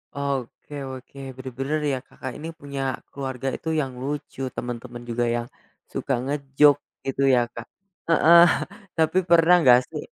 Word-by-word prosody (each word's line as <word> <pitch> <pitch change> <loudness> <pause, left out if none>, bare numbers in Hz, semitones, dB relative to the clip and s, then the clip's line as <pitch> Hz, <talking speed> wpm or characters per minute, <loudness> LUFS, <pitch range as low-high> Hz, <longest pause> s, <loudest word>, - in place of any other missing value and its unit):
Oke 140 0 -4 0.2
oke, 130 +1 -11 0.2
bener-bener 135 +4 -3
ya, - - 0
Kakak 130 - -7
ini 160 - -7
punya 140 -1 -5 0.3
keluarga 135 -2 -5
itu 160 - -5
yang 135 -2 -4
lucu, 140 0 -5
temen-temen 120 0 -6
juga 120 +1 0
yang, 120 0 -3 0.5
suka 135 - -1
nge-joke 140 +1 +3 0.2
gitu 135 0 -2
ya, - - +4
Kak. 115 - -7 0.4
Heeh, 170 +1 +7 0.6
tapi 160 +3 +2
pernah 170 +1 +6
nggak 125 -4 +7
sih - - -5
135 Hz, 140 wpm, -24 LUFS, 130-150 Hz, 0.6 s, Heeh